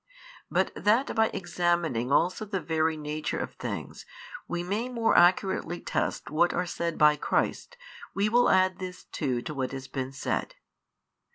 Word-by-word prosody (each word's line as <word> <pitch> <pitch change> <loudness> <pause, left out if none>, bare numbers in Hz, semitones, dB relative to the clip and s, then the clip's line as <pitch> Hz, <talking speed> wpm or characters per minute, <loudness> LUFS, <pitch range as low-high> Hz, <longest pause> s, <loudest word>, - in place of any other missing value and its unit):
But - - +1
that 225 +6 +2
by 220 -1 +4
examining 170 - -1
also 180 +8 +2
the 200 -2 -3
very 160 -1 0
nature 150 0 -3
of - - -4
things, - - -6 0.4
we 175 0 -2
may 210 +7 -2
more 230 -2 +1
accurately 175 -1 +3
test - - -2
what 170 +3 +2
are 180 - 0
said 170 -1 -3
by 150 0 +6
Christ, 485 - -1 0.4
we 200 +2 +2
will 240 +3 +4
add 185 0 +3
this 185 -1 -7
too 125 -6 -2
to 155 - -5
what 130 -2 -3
has 135 -1 -6
been 130 -1 -4
said. 135 - -3
175 Hz, 160 wpm, -28 LUFS, 150-195 Hz, 0.4 s, by